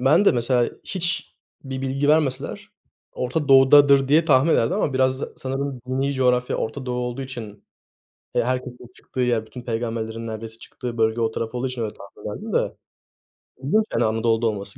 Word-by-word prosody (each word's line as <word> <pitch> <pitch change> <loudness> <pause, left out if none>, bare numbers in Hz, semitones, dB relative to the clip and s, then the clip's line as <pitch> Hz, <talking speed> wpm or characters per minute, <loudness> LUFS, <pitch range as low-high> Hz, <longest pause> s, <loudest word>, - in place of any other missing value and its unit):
ben 155 +10 +4
de - - +6
mesela 120 0 +2 0.2
hiçbir 175 -3 -2 0.3
bilgi 135 +1 -2
vermeseler 150 -4 0 0.4
Orta 135 +4 -2
Doğu'dadır 135 0 +7
diye 155 +3 +5
tahmin 145 +1 +4
ederdim 115 - +2
ama 140 - 0
biraz 130 0 +1
sanırım 135 0 -4
dini 135 +2 0
coğrafya 125 -1 +1
Orta 130 +4 -4
Doğu 125 0 -2
olduğu 125 +2 -3
için, 115 -6 -8 0.7
eee, - - +2
herkesin 125 -1 -4
çıktığı 130 - -7
yer, 120 -3 +1
bütün 125 +2 -10
peygamberlerin 115 -1 -3
neredeyse 110 0 -7
çıktığı 120 -2 -7
bölge 110 +1 +2
o 115 - +1
taraf 115 +1 -4
olduğu 125 +1 -1
için 125 -2 -4
öyle 105 - -4
tahmin 100 - -9
ederdim - - -7
de. - - 0 0.9
İlginç, 215 +11 +3
yani, - - +2
Anadolu'da 115 +1 +1
olması. 100 -2 -4
125 Hz, 165 wpm, -23 LUFS, 115-135 Hz, 0.9 s, Doğu'dadır